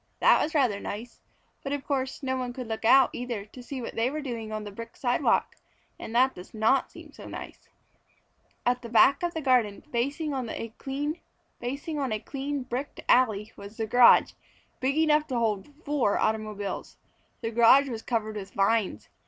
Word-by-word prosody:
That - - +5
was 315 - -2
rather 245 -9 +2
nice, 230 +4 -7 0.4
but 275 - -3
of 285 -1 -4
course 265 -1 -2
no 260 0 0
one 250 -1 -3
could 255 0 -6
look 220 0 -4
out 265 +3 +6
either 240 -5 -4
to 250 +4 -12
see 255 0 -6
what - - -5
they 230 +2 +1
were 305 +3 -4
doing 230 -5 -5
on 215 0 -4
the 205 - -7
brick 230 +3 -9
sidewalk, 245 -2 +1 0.4
and 225 - -7
that 260 +2 +4
does 180 +4 -12
not 225 +5 +2
seem - - -12
so - - -11
nice. - - -9 1.0
At 245 0 +1
the 235 - -8
back 240 +4 +5
of 345 -1 -2
the 320 - -2
garden, 250 -7 +2
facing 280 +6 -1
on 255 -4 -3
a 230 0 -5
clean 280 -1 -4
bricked 255 +3 -5
alley, 220 -4 +3
was 200 +2 -11
the 225 - -1
garage, 245 +2 +6 0.5
big 275 +2 0
enough 305 -1 +3
to 255 - -2
hold 215 -1 -1 0.2
four 285 -8 +1
automobiles. 215 -2 -2 0.4
The 225 - -3
garage 240 +5 +6
was 230 -4 -5
covered 220 -3 -2
with 195 -1 -8
vines. 200 - +1
245 Hz, 175 wpm, -27 LUFS, 220-275 Hz, 1.0 s, out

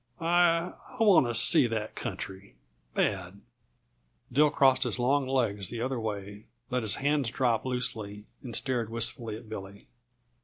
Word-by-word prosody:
I 170 0 +2 0.3
I - - +4
want 195 - +6
to 120 - -2
see 115 +2 +6
that 110 -2 -3
country, 95 +1 -7 0.4
bad." 95 -1 -1 0.9
Dill 150 +3 +5
crossed 135 -2 +4
his - - 0
long 130 +2 +1
legs 110 -8 0
the 120 -1 -5
other 130 -1 -2
way, 105 -1 -6 0.2
let 125 0 0
his 110 -3 0
hands 145 -3 0
drop 120 -2 0
loosely, 110 -5 -3 0.2
and 120 -4 -7
stared 120 -4 -1
wistfully 115 -1 -4
at 110 - -13
Billy. 100 -2 -9
115 Hz, 150 wpm, -29 LUFS, 105-135 Hz, 0.9 s, want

